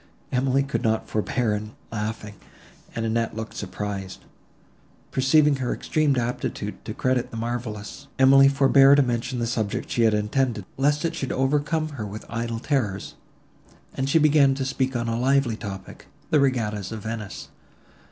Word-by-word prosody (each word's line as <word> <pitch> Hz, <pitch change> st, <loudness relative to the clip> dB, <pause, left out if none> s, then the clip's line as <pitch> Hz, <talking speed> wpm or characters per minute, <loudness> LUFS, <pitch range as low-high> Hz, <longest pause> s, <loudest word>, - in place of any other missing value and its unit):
—Emily 135 Hz, +2 st, +2 dB
could 140 Hz, 0 st, -2 dB
not 110 Hz, -2 st, 0 dB
forbear 110 Hz, -1 st, 0 dB, 0.3 s
laughing, 105 Hz, -1 st, -4 dB, 0.6 s
and 115 Hz, -1 st, -2 dB
Annette 115 Hz, 0 st, -1 dB
looked 110 Hz, 0 st, -6 dB
surprised. 100 Hz, -1 st, -5 dB, 0.9 s
Perceiving 145 Hz, +2 st, +4 dB
her 130 Hz, -2 st, -2 dB
extreme 155 Hz, -3 st, +1 dB
aptitude 120 Hz, -4 st, -3 dB
to 110 Hz, 0 st, -5 dB
credit 130 Hz, -2 st, 0 dB
the 115 Hz, -, -8 dB
marvellous, 115 Hz, -2 st, -5 dB
Emily 135 Hz, +1 st, +7 dB
forbore 140 Hz, 0 st, +6 dB
to 145 Hz, -, +5 dB
mention 125 Hz, +1 st, -2 dB
the 120 Hz, -, -1 dB
subject 115 Hz, 0 st, -2 dB
she 120 Hz, -, +1 dB
had 110 Hz, -2 st, +4 dB
intended, 105 Hz, 0 st, 0 dB
lest 145 Hz, +3 st, +1 dB
it 165 Hz, -, -1 dB
should 135 Hz, -5 st, -3 dB
overcome 150 Hz, +4 st, 0 dB
her 135 Hz, -8 st, -6 dB
with 105 Hz, +2 st, -8 dB
idle 115 Hz, 0 st, -3 dB
terrors, 115 Hz, -7 st, -2 dB, 0.8 s
and 135 Hz, +1 st, -2 dB
she 150 Hz, -, +4 dB
began 150 Hz, -3 st, +5 dB
to 135 Hz, -1 st, -2 dB
speak 130 Hz, 0 st, -1 dB
on 120 Hz, 0 st, -1 dB
a 115 Hz, 0 st, -1 dB
lively 135 Hz, -2 st, +2 dB
topic—the 100 Hz, +8 st, -4 dB
regattas 110 Hz, -8 st, 0 dB
of 110 Hz, -2 st, -6 dB
Venice. 110 Hz, -2 st, -6 dB
120 Hz, 150 wpm, -24 LUFS, 110-135 Hz, 0.9 s, Emily